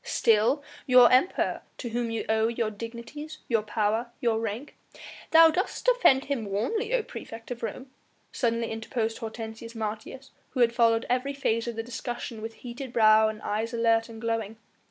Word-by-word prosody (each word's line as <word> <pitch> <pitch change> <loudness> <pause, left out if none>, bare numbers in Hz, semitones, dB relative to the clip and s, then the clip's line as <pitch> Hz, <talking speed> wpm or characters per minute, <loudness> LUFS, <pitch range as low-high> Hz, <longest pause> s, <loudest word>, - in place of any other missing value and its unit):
"Still 230 +5 +2 0.2
your 250 -2 +7
Emperor 260 +9 +2 0.2
to 240 - -5
whom 235 0 -2
you 225 -1 -3
owe 220 0 +2
your 230 -2 -1
dignities, 235 +8 -8
your 230 -3 +2
power, 215 +2 -1
your 230 -2 +1
rank 225 +5 -5 0.3
" - - -14
"Thou 325 0 +8
dost 370 +5 -2
defend 485 - +4
him 270 -7 -2
warmly, 420 - -1
O - - +2
praefect 225 - -9
of 240 - -5
Rome," 255 +4 -6 0.4
suddenly 230 -2 -1
interposed 225 0 -3
Hortensius 225 0 -7
Martius 220 +5 -6 0.2
who 255 - +1
had 235 -1 +4
followed 230 -1 +3
every 255 +3 0
phase 230 -4 -1
of 235 - -3
the 225 - -3
discussion 240 -1 -6
with 225 +1 -6
heated 245 +1 -6
brow 220 -1 +5
and 215 0 -5
eyes 225 +3 -2
alert 230 0 +2
and 225 -1 -9
glowing. 225 -1 -2
230 Hz, 175 wpm, -27 LUFS, 225-255 Hz, 0.4 s, Thou